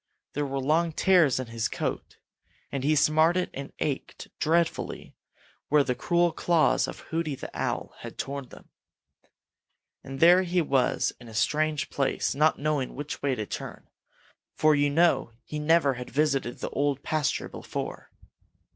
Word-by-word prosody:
There 145 0 -1
were 135 0 -2
long 160 +5 +1
tears 170 -8 +4
in 130 - -3
his 115 -1 -2
coat, - - -4 0.5
and 135 -2 -3
he 155 +2 +3
smarted 160 +5 +3
and 140 +1 -7
ached 140 -3 -4
dreadfully 165 +1 0 0.5
where 150 0 +5
the 125 - 0
cruel 175 +6 +1
claws 160 -5 +2
of - - -8
Hooty 160 -3 -1
the - - -8
Owl - - -3
had - - -9
torn 140 0 -4
him. - - -15 1.3
And 135 0 -7
there 175 +4 +7
he 180 -1 0
was 135 -6 +1
in 120 - -13
a 110 - -11
strange 155 +5 0
place, 135 -1 0
not 155 +3 +3
knowing 145 -3 -1
which 145 +2 -6
way 140 -2 0
to 110 - -4
turn, - - -7 0.7
for 155 0 +4
you 145 0 +2
know 165 -5 +2
he 150 - -5
never 150 -2 +3
had 125 0 -7
visited 135 -3 0
the - - -4
Old 140 -1 0
Pasture 155 -3 -1
before. - - -6
145 Hz, 155 wpm, -27 LUFS, 135-160 Hz, 1.3 s, there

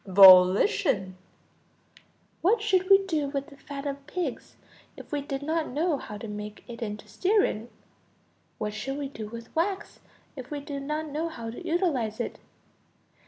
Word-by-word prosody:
Volition. 190 - +6 1.3
What 425 +7 +4
should 380 -3 +1
we 390 0 +7
do 310 -6 0
with 280 +2 -4
the - - -12
fat 280 0 -8
of 280 0 -5
pigs 360 +1 -4 0.4
if - - -12
we 295 -1 -1
did 275 -1 -4
not 320 +1 0
know 300 +2 0
how 210 - -7
to 225 - -7
make 210 0 -7
it 235 -1 -9
into 210 -2 -5
stearine? 370 - +1 0.9
What 210 -1 -3
should 270 +6 -4
we 285 -2 -4
do 220 -6 -7
with 230 +1 -10
wax 380 +4 -1 0.4
if 260 -3 -8
we 295 - -4
did 285 -1 -6
not 305 +2 -3
know 310 +3 -2
how 230 -7 -6
to 245 - -9
utilize 320 - 0
it? 235 - -4
280 Hz, 165 wpm, -27 LUFS, 225-325 Hz, 1.3 s, we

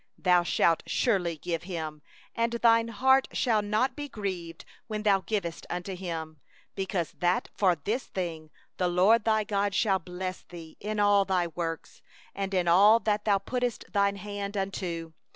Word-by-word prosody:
10Thou 180 -1 +4
shalt 170 -1 +2
surely 180 -9 +1
give 165 +1 -3
him, 160 -4 -5 0.3
and 230 0 0
thy 230 -1 +4
heart 265 +4 +3
shall 225 -4 +2
not 215 +5 0
be 290 -1 -6
grieved 185 -7 -5 0.2
when 215 -2 -4
thou 200 -2 +4
givest 185 -6 -3
unto 180 +2 -4
him; 165 -4 -6 0.3
because 190 -3 -2
that 175 +1 +1
for 185 -4 +3
this 215 - -3
thing 165 -4 -5 0.3
the 180 - +1
LORD 195 +6 +4
thy 220 -1 +3
God 200 -2 -1
will 195 -2 +2
bless 185 +1 -6
thee 165 -2 -12
in 210 +1 -3
all 205 -1 +5
thy 185 -2 +1
work, 165 -1 -4 0.5
and 195 0 -3
in 180 -2 +1
all 205 +6 +6
that 210 0 0
thou 205 -2 +4
puttest 245 +3 -3
thy 200 -1 +3
hand 205 0 -5
unto. 175 -4 -3
195 Hz, 165 wpm, -28 LUFS, 175-215 Hz, 0.5 s, all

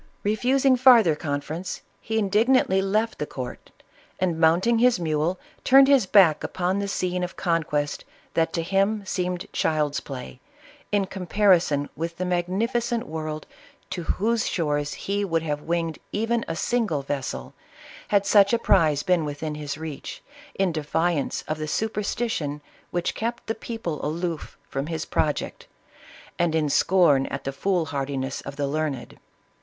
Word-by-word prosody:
Re 210 +1 +1
fusing 260 +2 +3
farther 235 - +7
conference, 155 +4 -4 0.2
he 220 +1 -3
indignantly 210 -1 +3
left 215 +4 0
the 150 - -2
court, 125 -2 -7 0.5
and 175 -3 0
mounting 175 +9 +4
his 245 -3 +4
mule, 160 +2 0 0.2
turned 270 +1 +7
his 270 -7 +4
back 180 -6 +5
upon 185 +2 -1
the 200 - -2
scene 180 -2 -1
of 180 - -4
conquest 155 -4 -1 0.3
that 165 0 +1
to 165 - -1
him 195 +3 +1
seemed 180 -1 -2
child's 150 -2 +1
play, 130 -2 -8 0.5
in 205 -1 +2
compar 190 +1 +3
ison 145 -4 -1
with 165 +2 -4
the 185 - -2
magnificent 210 +7 0
world, 155 -1 -5 0.5
to 185 -2 -3
whose 220 +7 0
shores 145 -4 -1
he 200 +1 -2
would 165 -4 0
have 150 -2 -2
winged 165 -1 -2
even 230 +2 0
a 165 - -3
single 200 - 0
vessel, 130 - -4 0.5
had 200 -1 +2
such 200 +1 +5
a - - +5
prize 160 -10 +3
been 180 -3 +2
within 150 +1 -4
his 150 -1 -5
reach, 155 -3 -7 0.3
in 190 -2 +1
defiance 160 0 -1
of 155 0 -3
the 155 - -3
super 215 +6 -1
stition 170 -10 -2 0.3
which 175 0 -1
kept 235 +2 -3
the 225 - -1
people 225 - -5
aloof 165 +1 -3
from 135 +2 -3
his 160 -2 -3
project, 150 -1 -2 0.7
and 170 -2 +2
in 155 -2 +1
scorn 150 -5 +4
at 135 0 -5
the 135 - -3
fool 180 +3 0
hardiness 135 -2 -3
of 140 - -8
the 145 0 -1
learned. 145 -3 -3
170 Hz, 155 wpm, -25 LUFS, 150-200 Hz, 0.7 s, farther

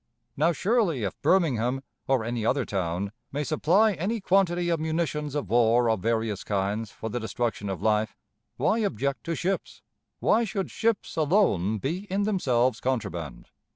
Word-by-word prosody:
Now, 160 +4 +3
surely, 185 - +1
if 100 - -4
Birmingham, 135 -8 +2 0.2
or 130 -4 +2
any 115 0 -2
other 130 +3 +1
town, 95 0 -2 0.2
may 145 +2 -2
supply 180 +8 +3
any 200 +7 -2
quantity 180 -3 +2
of 165 -2 +1
munitions 155 -2 -2
of 145 -8 -2
war 120 +2 +4
of 110 - 0
various 110 -1 -1
kinds 100 +2 -1
for 110 - -7
the 120 - -2
destruction 110 -2 -2
of 95 -4 -4
life, 110 0 +1 0.4
why 220 - +2
object 140 - -1
to 165 - -1
ships? 190 +4 -3 0.4
Why 230 +2 +3
should 195 -3 -3
ships 225 -6 -1
alone 145 - +2
be 170 - -3
in 200 +2 +1
themselves 130 - +1
contraband? 85 - -3
135 Hz, 155 wpm, -27 LUFS, 110-175 Hz, 0.4 s, war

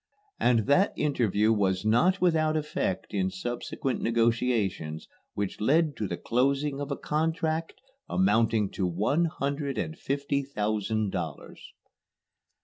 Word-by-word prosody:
And 115 -4 +3
that 185 +9 +3
interview 115 -7 +2
was 95 -2 0
not 165 - +3
without 155 -3 +2
effect 150 -10 -2
in 95 -2 +1
subsequent 120 +6 -3
negotiations 115 -8 0 0.3
which 100 0 -3
led 150 +5 +3
to 105 - -2
the 85 - -4
closing 140 +3 0
of 145 - -4
a 140 - -2
contract 160 +1 -1 0.3
amounting 115 - +2
to 95 - -1
one 105 - +1
hundred 140 -3 -2
and 160 - -2
fifty 140 0 -1
thousand 110 -4 -1
dollars. - - -6
125 Hz, 125 wpm, -28 LUFS, 105-150 Hz, 0.3 s, And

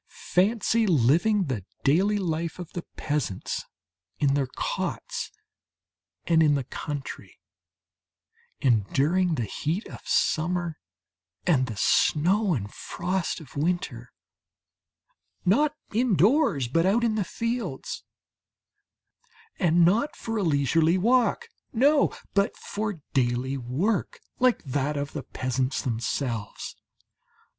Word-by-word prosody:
Fancy 220 +4 +3
living 170 - +3
the 130 - -3 0.2
daily 190 +9 +3
life 165 -3 -2
of 175 -3 -8
the 175 - -3 0.2
peasants 145 -11 -2 0.5
in 140 -2 +2
their 140 -2 +1
cots - - -3 0.9
and 165 -2 +4
in 150 -2 +5
the 140 - -1
country, 145 +2 -6 1.2
enduring 145 - +2
the 120 - -1
heat 160 - -3
of - - -9
summer 170 0 0 0.7
and 135 -7 +3
the 110 -4 -6
snow 180 - +3
and 100 -4 -5
frost 185 -1 -2
of 155 -6 -14
winter 140 -7 -2 1.3
not 290 +11 +3 0.2
indoors 215 - +3
but 165 +7 +2
out 225 +5 +3
in 230 -2 +2
the 215 -2 0
fields, 230 - -3 1.6
and 170 0 +4
not 225 - +2
for 225 - -4
a 215 - 0
leisurely 160 +2 +3
walk 245 - +2 0.3
no! 280 +5 +4 0.2
but 200 0 +1
for 205 -5 -4
daily 130 +1 +1
work 140 - -1 0.2
like 250 -1 +3
that 145 +2 -1
of 140 0 -3
the 150 - -3
peasants 130 +1 -2
themselves. 115 -2 -3
165 Hz, 110 wpm, -26 LUFS, 135-205 Hz, 1.6 s, in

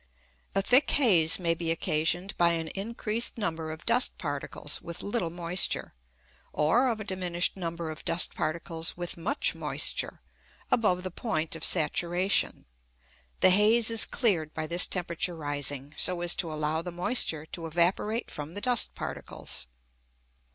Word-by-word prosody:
A 195 - +2
thick 255 +7 +4
haze 180 - +5
may 170 -2 +1
be 165 0 -4
occasioned 165 +3 -1
by 170 -1 +3
an 165 -1 -2
increased 220 +4 0
number 165 -7 -3
of 155 +1 -8
dust 240 +2 +3
particles 145 -1 -4
with 170 -1 -6
little 200 -4 -2
moisture, 175 +2 0 0.6
or 225 - +2
of 230 -3 -1
a - - -5
diminished 180 -3 -1
number 170 -3 -5
of 155 - -10
dust 170 - +3
particles 165 +1 -3
with 175 -1 -3
much 210 - +1
moisture, - - 0 0.5
above 180 -6 +2
the 185 - -5
point 165 -6 -2
of 160 - -9
saturation. 175 +5 0 0.8
The 185 - +6
haze 215 +4 +4
is 225 -1 +6
cleared 170 - -1
by 155 - -3
this 170 +3 +4
temperature 175 -1 -2
rising, 145 -2 -3
so 180 -1 +2
as 175 0 +4
to 165 -3 -2
allow 155 +1 -2
the 180 +1 -7
moisture 175 -3 0
to 165 -2 -5
evaporate 180 +7 0
from 150 +2 -7
the 205 - -5
dust 245 -1 +2
particles. - - -4
175 Hz, 150 wpm, -28 LUFS, 160-200 Hz, 0.8 s, The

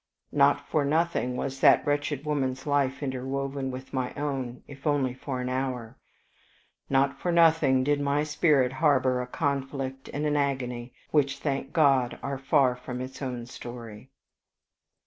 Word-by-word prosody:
Not 140 0 +3
for 155 - +1
nothing 145 -4 0
was 135 0 -3
that 140 -1 +6
wretched 145 0 -1
woman's 135 -3 -1
life 140 -1 0
interwoven 135 +1 -3
with 130 +1 -8
my 130 -1 -2
own, 135 -4 -3
if 140 +1 -8
only 140 -4 +1
for 130 0 -5
an 125 - -3
hour; 125 -2 -3 0.9
not 135 0 +2
for 175 - -1
nothing 160 -6 +4
did 145 +1 +1
my 145 +1 +1
spirit 150 -4 +2
harbor 130 -3 +2
a 125 - -5
conflict 135 -1 -3
and 145 +2 -2
an 150 -1 +1
agony, 125 -4 -2 0.2
which, 140 -2 +2
thank 135 -1 -2
God, 135 -7 +3
are 140 -1 -3
far 135 -2 +3
from 125 0 -6
its 130 +2 -7
own 125 -3 -4
story. 120 -1 -9
135 Hz, 150 wpm, -27 LUFS, 130-145 Hz, 0.9 s, that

